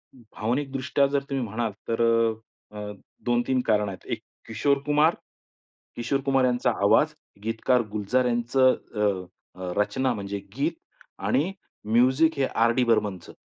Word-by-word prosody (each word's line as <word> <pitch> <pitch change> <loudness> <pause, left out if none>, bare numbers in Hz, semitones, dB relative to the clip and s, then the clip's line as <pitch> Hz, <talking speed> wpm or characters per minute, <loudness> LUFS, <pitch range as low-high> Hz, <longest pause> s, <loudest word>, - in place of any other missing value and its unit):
भावनिकदृष्ट्या 130 +4 -1
जर 140 0 0
तुम्ही 135 -2 -1
म्हणाल 110 +1 -2 0.2
तर 115 0 0 0.7
अ, 105 - -10
अ, 105 0 -5 0.3
2-3 120 +1 +1
कारणं 105 -2 +2
आहेत. 95 - -11
एक - - -2 0.3
किशोर 140 +6 +1
कुमार. 150 +3 +3 0.8
किशोर 135 +4 -1
कुमार 135 -1 +3
यांचा 125 -1 +2
आवाज. - - +4 0.3
गीतकार 115 +2 +1
गुलजार 110 +5 +1
यांचं 125 +2 +3 0.2
अ, 105 0 +1 0.5
अ, 90 -1 -4
रचना 130 +5 +1
म्हणजे 100 -1 -4 0.2
गीत 150 +5 0 0.5
आणि 155 +8 +2 0.4
म्युझिक 130 +7 +4
हे 135 - +2
आर 115 -1 +2
डी 130 - +3
बर्मनचं. 105 -6 0
125 Hz, 140 wpm, -26 LUFS, 110-135 Hz, 0.8 s, आवाज